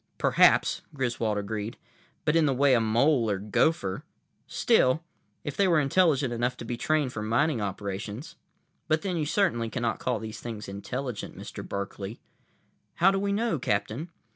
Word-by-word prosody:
"Perhaps," - - +4
Griswold 120 -5 -1
agreed. 105 +2 -4 0.5
"But 150 - +2
in 160 -2 +4
the 135 - +1
way 140 +1 +4
a 120 - +4
mole 115 +2 +3
or 100 - +1
gopher—still, 115 - 0 0.4
if 145 - -4
they 200 - +3
were 170 -4 +4
intelligent 145 -3 +2
enough 125 +2 -1
to - - -7
be 120 - -3
trained 150 +1 0
for 105 - -4
mining 115 +4 +1
operations—but 105 - -5
then 190 -3 -1
you 155 -3 -1
certainly 130 - +1
cannot 120 -1 -2
call 125 - 0
these 110 0 -7
things 110 -3 -6
intelligent, 120 +4 -5
Mr. - - -7
Berkeley." 100 +2 -5 0.8
"How 190 +3 +5
do 195 - 0
we 200 0 0
know, 205 -6 0
Captain?" 120 - -1
125 Hz, 155 wpm, -27 LUFS, 110-155 Hz, 0.8 s, How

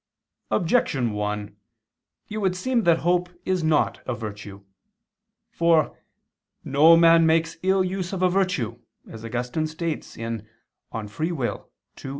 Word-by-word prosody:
Objection 155 - +1
1: 105 0 -3 0.7
It 215 - -5
would 190 -3 0
seem 240 +4 0
that 170 -1 +5
hope 180 0 +2 0.2
is 185 -2 0
not 155 -1 +1
a 125 - -1
virtue. 105 -2 -8 0.9
For 165 -2 +2 0.7
"no 155 +4 +6
man 165 -1 +6
makes 165 +1 +1
ill 190 0 +2
use 185 -1 -3
of 190 -2 -2
a - - +6
virtue," 175 - 0 0.3
as 110 0 -10
Augustine 125 +6 -2
states 160 0 -5
(De 115 - -5 0.6
Lib. 110 -2 -5
Arb. 155 +3 -3
160 Hz, 130 wpm, -24 LUFS, 115-180 Hz, 0.9 s, no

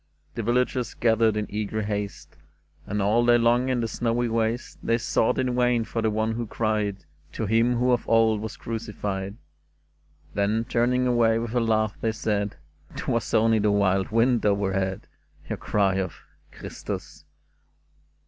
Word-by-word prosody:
The - - -3
villagers 125 +1 0
gathered 110 -2 +2
in 105 - -1
eager 110 +1 -3
haste, 105 -1 -4 0.5
And 105 0 -1
all 110 +4 +3
day 120 0 +5
long 120 +2 +2
in 125 -2 +1
the 115 - -1
snowy 120 +1 -1
waste 115 +2 -2
They 115 - +1
sought 115 -1 +1
in 130 -1 0
vain 125 -2 +2
for 115 +1 -3
the 110 - +2
one 110 +1 0
who 115 0 -3
cried 105 -4 -1 0.3
To 110 - -3
Him 115 +3 +2
who 125 +1 +2
of 120 - 0
old 115 -2 +3
was 110 -1 -6
crucified: 105 -3 -4 1.0
Then, 105 +3 0
turning 125 +1 +1
away 120 -2 +3
with 115 0 -3
a 125 - +2
laugh, 110 -3 0
they 110 -1 0
said, 105 -2 -1 0.2
'' - - -24
'Twas - - -2
only 110 0 +4
the 105 0 +2
wild 95 -2 +2
wind 115 +1 +2
overhead, 95 -2 0 0.4
Your - - -3
cry 100 -2 +1
of 95 -7 -2 0.2
' - - -36
Christus - - -7
110 Hz, 165 wpm, -25 LUFS, 105-120 Hz, 1.0 s, day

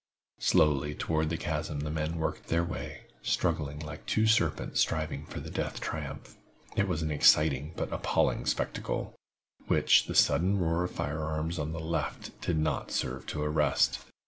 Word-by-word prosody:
Slowly 75 0 +3
toward 80 0 0
the 80 - -1
chasm 75 -2 -3
the 75 0 -3
men 80 +1 -2
worked 80 - -3
their 85 +1 +2
way, 85 - -5 0.2
struggling 75 -5 0
like 75 0 -7
two 110 - +2
serpents 110 0 +2
striving 75 -2 0
for - - -6
the - - -8
death - - -3
triumph. - - -6 0.4
It 100 - +2
was 85 -4 -1
an 80 - -1
exciting 75 0 +4
but - - -3
appalling - - +1
spectacle, - - -2 0.5
which - - +4
the - - -4
sudden 95 +4 +4
roar 85 -1 +1
of - - -3
fire 75 +3 -3
arms 80 +2 -2
on 75 +1 -2
the 80 - -4
left 85 +1 -3
did 85 - 0
not 75 0 0
serve 65 +1 -2
to 75 - -2
arrest. 75 -1 +2
80 Hz, 170 wpm, -30 LUFS, 75-85 Hz, 0.5 s, exciting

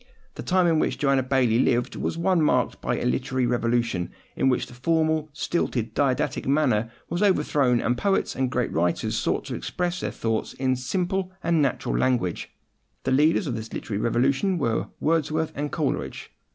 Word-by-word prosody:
The - - -7
time 185 -1 +2
in 165 -2 +3
which - - 0
Joanna 135 -2 +2
Baillie 125 -3 +2
lived 120 -1 +1
was - - -3
one 180 0 +2
marked 150 - +1
by - - -1
a - - -3
literary 125 - 0
revolution, 120 -6 0 0.3
in 135 - +2
which 125 - +1
the - - -14
formal, 155 +3 +1
stilted, 140 -6 -1
and 110 - -20
didactic 130 -1 0
manner 130 -6 +2 0.2
was 175 - -2
overthrown, 150 - +3
and 120 - +1
poets 195 +10 0
and 130 -1 0
great 125 -1 -1
writers 85 +1 0
sought - - -1
to - - -4
express 180 0 -2
their - - -2
thoughts 115 -1 -2
in 130 -1 0
simple 185 +8 -2
and 165 -2 +2
natural 135 -3 0
language. 125 -9 0 0.5
The - - -1
leaders 155 +8 +3
of 135 - -2
this 110 0 -6
literary 105 -1 -3
revolution 135 - +1
were 115 -8 0
Wordsworth 155 0 0
and 145 +1 -3
Coleridge. 150 -5 -3
135 Hz, 180 wpm, -25 LUFS, 120-160 Hz, 0.5 s, in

